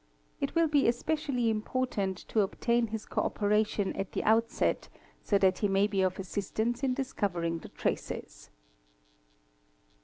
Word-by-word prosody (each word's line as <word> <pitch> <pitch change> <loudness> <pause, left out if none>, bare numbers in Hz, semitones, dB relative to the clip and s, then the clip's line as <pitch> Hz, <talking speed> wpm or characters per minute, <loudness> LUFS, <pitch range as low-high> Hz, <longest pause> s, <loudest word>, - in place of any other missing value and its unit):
It 275 +2 -2
will 330 -1 +4
be 290 -2 +3
especially 250 -1 +1
important 215 -3 -1
to 220 - +1
obtain 235 +4 +1
his 220 0 -5
co - - -1
operation 210 -1 +1
at 195 - -4
the - - -1
outset 225 +2 +2 0.3
so 200 - +2
that 190 -2 +3
he 205 - +2
may 195 +1 +3
be 200 -2 0
of 185 0 +1
assistance 220 +5 -2
in 260 -2 +1
discovering 175 -11 -1
the - - -11
traces. - - -4
215 Hz, 145 wpm, -30 LUFS, 195-245 Hz, 0.3 s, will